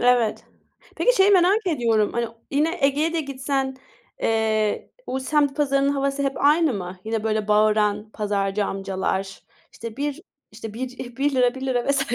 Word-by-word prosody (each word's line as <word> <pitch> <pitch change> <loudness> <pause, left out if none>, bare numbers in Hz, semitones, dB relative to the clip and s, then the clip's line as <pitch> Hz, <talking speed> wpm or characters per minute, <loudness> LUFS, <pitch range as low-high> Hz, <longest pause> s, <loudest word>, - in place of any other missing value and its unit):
Evet. 245 -3 +2 0.5
Peki, - - +3
şeyi 385 +1 +5
merak 390 +3 +4
ediyorum. 230 - +1
Hani, 235 -1 -1 0.2
yine, 310 +5 +1
Ege'ye 295 +4 +1
de 335 - 0
gitsen, 270 -1 -2 0.5
eee, 220 -1 0 0.2
o 260 - -2
semt 285 +1 +1
pazarının 275 -1 +2
havası 275 0 -1
hep 275 -1 0
aynı 300 -2 +4
mı? 180 -1 -6
Yine, 220 0 -2
böyle, 215 -1 -1
bağıran 210 0 +2
pazarcı 205 -1 -1
amcalar. 195 0 -3 0.3
İşte, 230 -1 -8
1, 290 +2 -3 0.3
işte, 220 0 -8
1, 250 0 -6
₺1 260 -3 +2
₺1 260 -2 -1
vs. 275 -1 +2
255 Hz, 150 wpm, -23 LUFS, 215-280 Hz, 0.5 s, şeyi